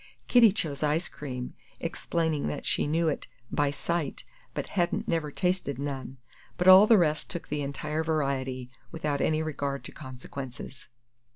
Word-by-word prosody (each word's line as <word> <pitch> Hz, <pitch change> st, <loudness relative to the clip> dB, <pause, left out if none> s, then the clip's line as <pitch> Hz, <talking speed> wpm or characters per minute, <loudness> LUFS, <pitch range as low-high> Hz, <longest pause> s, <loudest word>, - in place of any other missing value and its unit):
Kitty 235 Hz, -4 st, +7 dB
chose 155 Hz, -8 st, -3 dB
ice 155 Hz, +3 st, +1 dB
cream, 125 Hz, -4 st, -6 dB, 0.3 s
explaining 160 Hz, -, -1 dB
that 75 Hz, -, -4 dB
she -, -, +1 dB
knew 165 Hz, +2 st, +2 dB
it 150 Hz, -, -1 dB, 0.2 s
"by 145 Hz, -1 st, +2 dB
sight," 155 Hz, +1 st, -2 dB, 0.3 s
but -, -, -2 dB
hadn't 175 Hz, -3 st, 0 dB
never 165 Hz, -3 st, 0 dB
tasted 180 Hz, -4 st, -1 dB
none; 135 Hz, -2 st, -4 dB, 0.4 s
but 180 Hz, -, +1 dB
all 190 Hz, +3 st, +10 dB
the 225 Hz, -, +7 dB
rest 155 Hz, -4 st, +1 dB
took 170 Hz, -, -6 dB
the 150 Hz, 0 st, -1 dB
entire 150 Hz, +3 st, -2 dB
variety, 135 Hz, -5 st, -1 dB, 0.2 s
without 150 Hz, -3 st, -1 dB
any 155 Hz, 0 st, +2 dB
regard 140 Hz, -3 st, -3 dB
to -, -, -8 dB
consequences. 130 Hz, 0 st, -8 dB
150 Hz, 155 wpm, -28 LUFS, 140-165 Hz, 0.4 s, all